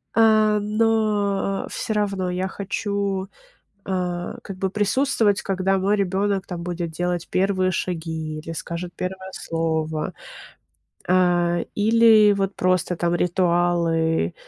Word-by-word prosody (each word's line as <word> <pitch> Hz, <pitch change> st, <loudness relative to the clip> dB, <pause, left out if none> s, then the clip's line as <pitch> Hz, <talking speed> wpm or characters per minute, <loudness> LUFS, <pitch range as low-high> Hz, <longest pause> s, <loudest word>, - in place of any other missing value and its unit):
А, 215 Hz, -1 st, +4 dB
но 210 Hz, -2 st, 0 dB
всё 220 Hz, -, -3 dB
равно 200 Hz, -3 st, -1 dB
я 185 Hz, +1 st, -1 dB
хочу, 200 Hz, 0 st, -2 dB, 0.6 s
а, 180 Hz, +1 st, -3 dB
как 195 Hz, -2 st, -8 dB
бы 190 Hz, -, 0 dB
присутствовать, 210 Hz, 0 st, +1 dB
когда 195 Hz, 0 st, 0 dB
мой 200 Hz, +2 st, +2 dB
ребенок 195 Hz, 0 st, 0 dB
там 175 Hz, -2 st, -6 dB
будет 175 Hz, -1 st, -4 dB
делать 175 Hz, +1 st, -2 dB
первые 185 Hz, 0 st, +1 dB
шаги 160 Hz, -3 st, -3 dB
или 160 Hz, +2 st, -7 dB
скажет 170 Hz, +2 st, -5 dB
первое 190 Hz, +1 st, -5 dB
слово, 160 Hz, -2 st, -2 dB, 1.0 s
а, 175 Hz, -1 st, +3 dB
или 220 Hz, -1 st, +5 dB
вот 195 Hz, 0 st, -2 dB
просто 185 Hz, -1 st, +1 dB
там 170 Hz, 0 st, 0 dB
ритуалы, 170 Hz, -, +1 dB
185 Hz, 115 wpm, -23 LUFS, 175-205 Hz, 1.0 s, или